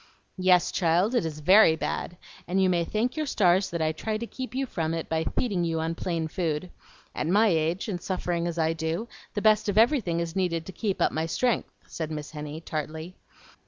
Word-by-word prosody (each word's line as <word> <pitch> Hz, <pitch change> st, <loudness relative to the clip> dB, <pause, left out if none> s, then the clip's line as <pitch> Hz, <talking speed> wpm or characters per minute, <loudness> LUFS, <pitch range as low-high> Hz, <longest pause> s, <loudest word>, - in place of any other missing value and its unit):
"Yes, 185 Hz, -1 st, +4 dB
child, 180 Hz, +6 st, +2 dB
it 240 Hz, -10 st, +1 dB
is 150 Hz, -1 st, -7 dB
VERY 185 Hz, 0 st, +7 dB
bad, 175 Hz, +2 st, -3 dB, 0.3 s
and 185 Hz, +2 st, +1 dB
you 190 Hz, -1 st, +4 dB
may 170 Hz, -1 st, +2 dB
thank 220 Hz, +8 st, -1 dB
your 310 Hz, -1 st, -2 dB
stars 190 Hz, -6 st, +3 dB
that 170 Hz, -2 st, -2 dB
I 155 Hz, -, +2 dB
try 215 Hz, +7 st, -3 dB
to 235 Hz, -, -4 dB
keep 255 Hz, +1 st, -7 dB
you 270 Hz, +1 st, 0 dB
from 165 Hz, -8 st, -2 dB
it 165 Hz, -, -4 dB
by 160 Hz, 0 st, -1 dB
feeding 200 Hz, -8 st, +1 dB
you 165 Hz, -1 st, 0 dB
on 160 Hz, +1 st, -1 dB
plain 165 Hz, -1 st, -2 dB
food. 165 Hz, +1 st, -2 dB, 0.4 s
At 150 Hz, -, -2 dB
my 210 Hz, +5 st, +4 dB
age, 165 Hz, +3 st, 0 dB
and 180 Hz, -5 st, -3 dB
suffering 175 Hz, -2 st, -2 dB
as 170 Hz, -1 st, -4 dB
I 160 Hz, 0 st, +2 dB
do, 165 Hz, +7 st, -3 dB, 0.3 s
the 205 Hz, -, -2 dB
best 215 Hz, -1 st, +4 dB
of 205 Hz, -, -1 dB
everything 225 Hz, -, +3 dB
is 170 Hz, 0 st, -3 dB
needed 170 Hz, -4 st, 0 dB
to -, -, -7 dB
keep 200 Hz, 0 st, -1 dB
up -, -, +2 dB
my 160 Hz, +1 st, -1 dB
strength," 240 Hz, +8 st, 0 dB, 0.2 s
said 160 Hz, -2 st, -5 dB
Miss 150 Hz, -1 st, -6 dB
Henny, 150 Hz, 0 st, -6 dB
tartly. 160 Hz, +2 st, -5 dB
175 Hz, 215 wpm, -27 LUFS, 160-205 Hz, 0.4 s, VERY